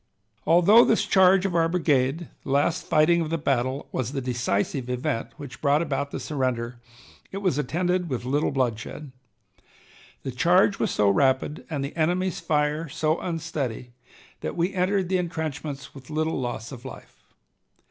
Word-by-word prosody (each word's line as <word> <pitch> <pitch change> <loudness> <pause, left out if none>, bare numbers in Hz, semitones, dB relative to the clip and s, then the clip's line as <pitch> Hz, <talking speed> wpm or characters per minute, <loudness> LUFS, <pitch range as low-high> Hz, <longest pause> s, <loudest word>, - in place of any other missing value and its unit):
Although 180 +8 +7
this 225 - +2
charge 190 0 +5
of 190 - -1
our 165 -1 +2
brigade, 155 -2 +1 0.2
the - - -9
last 145 +6 +1
fighting 170 +3 +4
of 160 - -2
the 165 - 0
battle, 135 -2 -1
was 130 +1 -3
the 140 - -1
decisive 125 0 -1
event 125 -1 -2
which 140 -3 -10
brought 145 +2 +3
about 140 -2 -2
the - - -5
surrender, 125 -4 -2 0.5
it 195 - -5
was 185 -8 0
attended 175 +5 0
with 125 -3 -3
little 145 +4 +1
bloodshed. 130 +2 -3 1.1
The 135 - -3
charge 180 +8 +3
was 220 - +1
so 105 - +2
rapid 135 +5 +1
and 145 -4 -2
the 140 - -7
enemy's 175 +3 0
fire 150 +1 0
so 155 +1 0
unsteady, 150 -8 -4 0.5
that 80 - -5
we 175 +3 0
entered 190 0 +1
the 185 0 +1
intrenchments 155 -5 -4
with 135 -2 -13
little 155 -2 -1
loss 120 -1 -4
of 125 -3 -9
life. 130 - -11
150 Hz, 160 wpm, -25 LUFS, 130-170 Hz, 1.1 s, Although